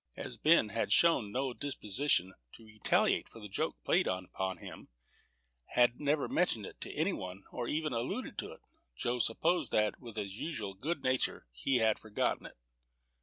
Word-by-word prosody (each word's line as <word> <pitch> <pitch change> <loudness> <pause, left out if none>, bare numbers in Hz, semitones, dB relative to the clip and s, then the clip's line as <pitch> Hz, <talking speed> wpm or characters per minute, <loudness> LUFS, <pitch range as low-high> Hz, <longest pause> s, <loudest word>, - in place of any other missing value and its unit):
As - - -5
Ben 155 -8 +5
had 115 +2 -1
shown 135 -12 +5
no 130 +1 -1
disposition 120 -7 0 0.2
to 115 - -14
retaliate 110 -1 +1
for 115 - -12
the 105 - -7
joke 95 - -2
played - - +3
upon 95 +1 -2
him, - - -10 0.9
had 120 0 +4
never 145 0 +1
mentioned 115 - +1
it - - -11
to - - -5
any - - +1
one, 95 +1 -6
or 120 -1 -3
ever 155 -2 -1
alluded 115 - -3
to - - -4
it, - - -16 0.4
Joe 125 +1 -1
supposed 160 +11 +2
that, 105 0 +2
with 115 -3 -10
his 100 -1 -4
usual 110 -12 -3
good 145 - -3
nature, 130 0 +1
he 130 - 0
had 110 -3 +3
forgotten 110 -1 -1
it. - - -16
115 Hz, 170 wpm, -33 LUFS, 105-140 Hz, 0.9 s, Ben